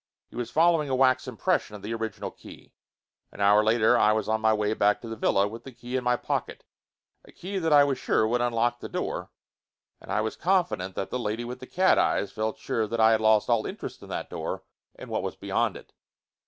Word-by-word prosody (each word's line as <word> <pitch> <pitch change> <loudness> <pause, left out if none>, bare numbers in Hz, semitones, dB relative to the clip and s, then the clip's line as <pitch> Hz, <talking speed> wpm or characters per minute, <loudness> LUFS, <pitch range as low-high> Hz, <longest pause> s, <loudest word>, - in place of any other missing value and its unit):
He - - -14
was 120 -1 -4
following 160 +1 +3
a 130 - +1
wax 130 0 +3
impression 130 - -1
of 100 - -11
the 110 +3 -4
original 110 -2 -4
key. - - -15 0.6
An - - -15
hour 105 +1 +5
later 110 +2 +4
I 105 0 +4
was 110 -1 -1
on 110 0 0
the 110 0 +3
way 105 0 0
back 105 -1 +2
to 115 - -8
the 115 - -5
villa, 100 -2 +2
with 115 +3 -9
the 135 - -10
key 120 +1 -7
in 130 - 0
my 125 0 +2
pocket, - - -3 0.6
a - - -17
key 195 +2 -5
that 165 -3 -1
I 145 -1 +7
was 140 -2 -1
sure 110 - +1
would 120 +2 0
unlock 120 0 0
the - - -7
door, - - -4 0.7
and - - -10
I 100 +1 +1
was 110 0 -3
confident 175 - 0
that 95 - -4
the 125 - -2
lady 115 +1 -3
with 125 +1 -7
the 130 - -10
cat 185 +1 +3
eyes 100 - +1
felt 110 0 -3
sure 110 -1 -2
that 115 +2 -3
I 110 0 +6
had 110 -1 +2
lost 110 -1 +4
all 115 -3 +1
interest 200 - -7
in - - -12
that - - -5
door - - -4 0.3
and - - -10
what - - -1
was - - -4
beyond - - -1
it. - - -16
115 Hz, 235 wpm, -26 LUFS, 110-130 Hz, 0.7 s, I